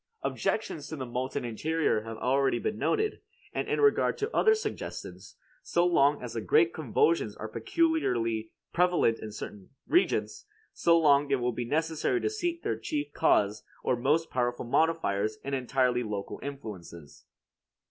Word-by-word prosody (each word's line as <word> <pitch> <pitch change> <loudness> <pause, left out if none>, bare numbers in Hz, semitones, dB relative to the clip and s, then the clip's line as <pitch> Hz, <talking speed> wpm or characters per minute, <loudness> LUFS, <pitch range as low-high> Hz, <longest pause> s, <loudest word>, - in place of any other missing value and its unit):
Objections 155 -9 -2
to 160 - -5
the 135 -3 -5
molten 125 +1 -3
interior 150 +1 0
have 115 +1 -7
been - - -10
already 135 -1 +2
noted; 165 - -1 0.3
and - - -2
in - - 0
regard 425 -1 +3
to 420 - 0
the 470 - -8
other 440 0 +5
suggestions, 435 - -6 0.3
so 175 0 +1
long 145 -5 +3
as 120 -2 -6
the 115 - -3
great 165 +8 +3
convulsions 145 -4 +1
are 110 - -6
peculiarly 115 - 0 0.2
prevalent 175 -10 +3
in 110 - -7
certain 105 -2 -8 0.2
regions, 355 - +1 0.3
so 170 -1 +4
long 145 -3 +4
it 140 - +3
will 125 -1 0
be 120 +1 -3
necessary 160 - 0
to 425 - -1
seek 345 -5 -3
their - - -1
chief 145 -1 -3
cause 105 +1 +2 0.2
or - - +2
most 150 +7 +1
powerful 120 -1 -1
modifiers 115 -8 +1
in 140 - -4
entirely 125 -1 +1
local 105 -4 -5
influences. 100 - -9
135 Hz, 155 wpm, -29 LUFS, 115-165 Hz, 0.3 s, other